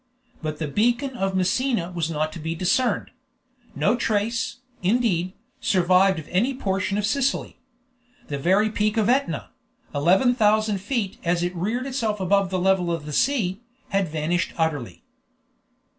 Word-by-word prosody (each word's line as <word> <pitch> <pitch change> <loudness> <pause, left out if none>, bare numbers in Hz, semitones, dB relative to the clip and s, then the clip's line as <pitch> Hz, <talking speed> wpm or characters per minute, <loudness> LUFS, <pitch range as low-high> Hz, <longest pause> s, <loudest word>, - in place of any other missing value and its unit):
But 155 -1 -3
the 155 - -3
beacon 240 - +1
of 195 -4 -1
Messina 185 0 +1
was 170 -2 -2
not 155 -1 -1
to 170 - -7
be 160 +1 -3
discerned; 185 +9 +1 0.6
no - - +2
trace, 230 0 -1 0.3
indeed, 185 -3 +1 0.3
survived 185 0 +3
of 155 - -7
any 235 +9 +1
portion 195 -4 -1
of 210 - 0
Sicily; 275 +5 -1 0.7
the 140 -1 -3
very 195 +8 +3
peak 215 +1 0
of 220 0 +2
Etna, 275 +3 0 0.4
11,000 210 - +3
feet 205 -1 -2
as 175 0 +1
it 175 +1 -1
had 170 - -6
reared 235 +7 -1
itself 230 -6 -1
above 195 +1 +2
the 185 - -1
level 185 -1 +2
of 165 -3 -3
the 150 - -6
sea, 215 - +1 0.3
had 195 -2 +1
vanished 160 +3 -1
utterly. 160 - -2
190 Hz, 150 wpm, -24 LUFS, 170-225 Hz, 0.7 s, survived